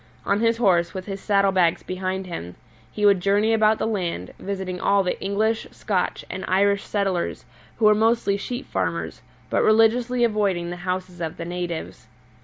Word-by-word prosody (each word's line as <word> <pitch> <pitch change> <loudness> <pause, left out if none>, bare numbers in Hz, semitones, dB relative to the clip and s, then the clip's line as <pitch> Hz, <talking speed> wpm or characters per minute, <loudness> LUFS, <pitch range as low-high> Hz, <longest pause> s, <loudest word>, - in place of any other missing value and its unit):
On 200 +1 +1
his 230 0 +2
horse, 175 -7 +2
with 185 -1 -5
his 195 -1 -6
saddle 200 -1 +3
bags 175 -3 +2
behind 185 +1 -3
him, 90 - -7 0.4
he 210 - -1
would 200 -2 +5
journey 205 +4 +2
about 220 0 +4
the - - -1
land, 180 - -3
visiting 190 -2 -4
all 200 0 +3
the 180 - -2
English, 215 +3 0
Scotch, 185 -4 -2
and 190 - -6
Irish 200 +1 +3
settlers, 195 -4 -2 0.3
who 225 - +1
were 210 - +7
mostly 220 -1 +2
sheep 245 +6 -5
farmers, - - -3 0.3
but - - +2
religiously 230 +3 +3
avoiding 200 -6 0
the 175 - -5
houses 180 0 -4
of 160 -1 -4
the 170 - -5
natives. 175 -8 -5
195 Hz, 175 wpm, -23 LUFS, 180-215 Hz, 0.4 s, were